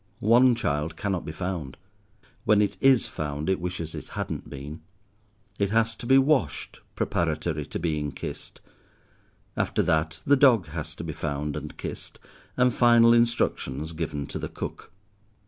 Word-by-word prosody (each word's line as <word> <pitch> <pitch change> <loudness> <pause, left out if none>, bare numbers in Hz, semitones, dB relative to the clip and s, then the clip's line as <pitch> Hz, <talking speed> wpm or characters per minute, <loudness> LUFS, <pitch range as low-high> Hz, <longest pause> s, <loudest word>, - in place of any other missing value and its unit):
One 120 +2 +5
child 75 -3 -2
cannot 95 -4 -2
be - - -4
found. 85 -5 -4 0.7
When 105 -1 +4
it 105 -1 +1
is 135 -3 +5
found 75 +2 -4
it 95 - 0
wishes 85 -2 -4
it - - -7
hadn't - - -4
been. 75 +3 -8 0.8
It 100 -1 +1
has 115 +1 +2
to 120 - -7
be 135 +1 +6
washed, 135 - +1 0.2
preparatory 80 -2 -1
to - - -4
being 75 -3 -1
kissed. 70 - -7 0.9
After - - 0
that, 80 0 0
the 145 - +5
dog 130 -8 +5
has 80 +1 -6
to 85 - -7
be 80 -2 -4
found 75 0 -3
and - - -7
kissed, - - -7 0.4
and 125 -1 +4
final 120 -1 +6
instructions 100 - +1
given 75 -3 -3
to - - -6
the - - -4
cook. - - -7
85 Hz, 155 wpm, -26 LUFS, 75-115 Hz, 0.9 s, be